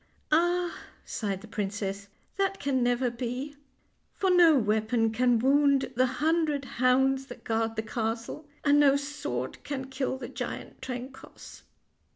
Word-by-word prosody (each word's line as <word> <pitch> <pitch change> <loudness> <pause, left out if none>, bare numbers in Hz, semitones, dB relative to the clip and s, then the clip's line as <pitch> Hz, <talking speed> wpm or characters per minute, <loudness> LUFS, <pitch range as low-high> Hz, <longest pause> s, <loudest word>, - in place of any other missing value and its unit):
" - - -41
Ah! 350 +2 +2 0.2
" - - -29
sighed 200 -4 -3
the 220 - -11
princess, 200 -1 -3
" - - -38
that 390 0 0
can 270 -2 0
never 245 0 +1
be, 250 +4 -4 0.6
for 380 -1 +1
no 340 -4 +6
weapon 220 0 +1
can 245 +1 +3
wound 275 +2 +3
the 255 +2 +3
hundred 300 +1 0
hounds 265 +2 +2
that 245 - -11
guard 225 0 -1
the 220 - -2
castle, 225 +6 -4 0.2
and 290 0 +5
no 280 -1 +6
sword 280 - -4
can 270 -2 -4
kill 260 0 -2
the - - -6
giant - - -6
Trencoss." 260 +1 -8
255 Hz, 155 wpm, -28 LUFS, 225-285 Hz, 0.6 s, no